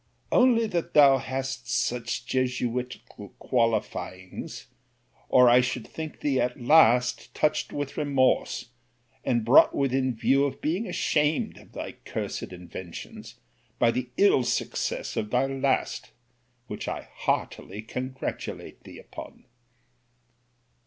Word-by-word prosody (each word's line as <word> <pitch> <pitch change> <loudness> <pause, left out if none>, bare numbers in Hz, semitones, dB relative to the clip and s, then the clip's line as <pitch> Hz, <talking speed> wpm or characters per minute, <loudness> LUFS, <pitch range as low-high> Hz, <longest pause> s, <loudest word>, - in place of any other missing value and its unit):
Only 245 -2 +4
that 175 -6 -3
thou 140 -3 +7
hast 130 -1 -4
such 120 -1 -1
jesuitical 125 -5 -3
qualifyings, 110 -6 -2 0.6
or 125 -1 +6
I 120 +1 +7
should 125 -2 -3
think 160 -1 -7
thee 140 -3 +1
at 125 +3 -2
last 125 -2 +4
touched 150 0 0
with 145 -1 -4
remorse, 135 -4 +1 0.5
and 120 -3 0
brought 125 +5 +6
within 130 -2 +1
view 135 +5 +3
of 135 -2 -4
being 180 +9 -1
ashamed 150 0 0
of - - -19
thy - - -5
cursed - - -4
inventions 90 -1 -9 0.4
by 115 - +4
the 125 +1 -3
ill 200 -9 +5
success - - -2
of 105 - -2
thy 125 +3 +2
last: 135 0 -1 0.6
which 105 - -6
I - - -4
heartily 105 +4 -3
congratulate 130 +3 -6
thee - - -12
upon. - - -11
130 Hz, 120 wpm, -26 LUFS, 120-140 Hz, 0.6 s, thou